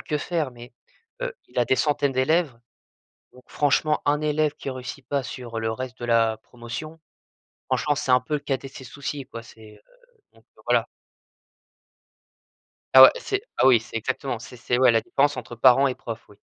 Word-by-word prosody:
que 150 - -2
faire, 155 -2 -2
mais, 120 0 -13 0.5
heu, - - -3
il - - -6
a 120 - +2
des 130 - +2
centaines 145 -2 +1
d'élèves, 135 0 +1 0.7
donc 125 0 -18
franchement 150 +1 +1
un 145 +1 +2
élève 150 -1 0
qui 135 - -6
réussit 130 +1 -8
pas 140 -1 -1
sur 120 -3 -6
le 110 0 -1
reste 130 +2 -6
de 120 - -5
la 115 -1 +2
promotion, 125 +8 -9 0.7
franchement 150 - 0
c'est 130 - -3
un 125 0 +5
peu 125 - -10
le 145 - -1
cadet 135 -1 -3
de 135 - -21
ses 130 - -10
soucis 140 +1 -6
quoi, 115 - -9
c'est, 110 -2 -15
heu - - -20 0.5
donc - - -23
heu, - - -19
voilà. - - +2 2.1
Ah - - +11
ouais - - +11
c'est 400 -3 -2 0.2
ah - - +3
oui 120 -4 +6
c'est 115 - -13
exactement 130 +2 -2
c'est 125 +2 -12
c'est 120 +1 -1
ouais 130 -2 +5
la 115 - +3
différence 140 +4 0
entre 120 -1 -7
parents 130 +3 +5
et 130 - -2
profs 115 -1 -8
oui. 105 - -18
130 Hz, 195 wpm, -24 LUFS, 120-145 Hz, 2.1 s, Ah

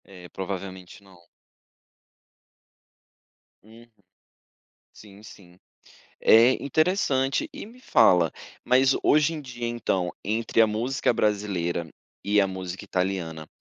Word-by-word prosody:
É, 90 -2 -13
provavelmente 95 -1 -7
não. 95 -3 -19 2.4
Uhum, 115 +2 -17 1.1
sim 105 -1 -16
sim, 90 -5 -16 0.6
é 115 +3 +6
interessante 140 -3 0
e - - -8
me 235 +4 -16
fala, 90 - +4 0.3
mas 130 +2 +4
hoje 150 +2 +3
em 160 - -5
dia 120 -3 -7
então, 95 -7 -2
entre 115 +2 +1
a 110 - +5
música 120 +5 -1
brasileira 100 -6 -1 0.4
e 105 0 +3
a 100 - +1
música 95 -1 -7
italiana, 90 -4 -3
105 Hz, 105 wpm, -25 LUFS, 95-125 Hz, 2.4 s, é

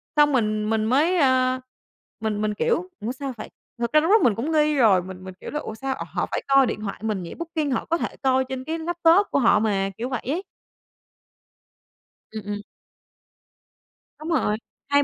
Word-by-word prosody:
xong 295 -1 +5
mình 215 -4 +1
mình 220 -1 +1
mới, 305 +10 +3
ơ, 260 -3 +3 0.6
mình 215 -2 -2
mình, 215 0 0
kiểu: 335 - 0 0.2
"Ủa 235 - -1
sao 265 0 -5
phải?" 215 - -7 0.3
thực 235 0 -2
ra 305 - +6 0.2
mình 225 -5 +4
cũng 275 +8 -2
nghi 305 -1 +3
rồi 215 -9 +5
mình 185 0 -9
mình, 190 0 -8
kiểu, - - -7
là 300 - -2
"Ủa 220 - -6
sao, 265 +3 -3
ồ, - - -6
họ - - 0
phải - - -1
coi 275 -1 +6
điện 215 - -3
thoại 200 -2 -5
mình 210 -4 -2
nhỉ? 170 - -7
booking 320 -4 -3
họ 235 - -1
có 335 - 0
thể - - -4
coi 260 0 +3
trên 260 -1 -4
cái 320 +4 -3
laptop 340 +3 +3
của - - +2
họ 230 -4 +5
mà." 200 -3 +1
Kiểu 245 +3 -3
vậy 255 -4 -2
ấy. 325 +8 -1 1.9
Ừ, 220 0 -5
ừm. 205 0 -4 1.6
Đúng 310 +2 -6
rồi, 215 -10 +1 0.3
hai 285 0 +4
260 Hz, 200 wpm, -24 LUFS, 215-300 Hz, 1.9 s, ra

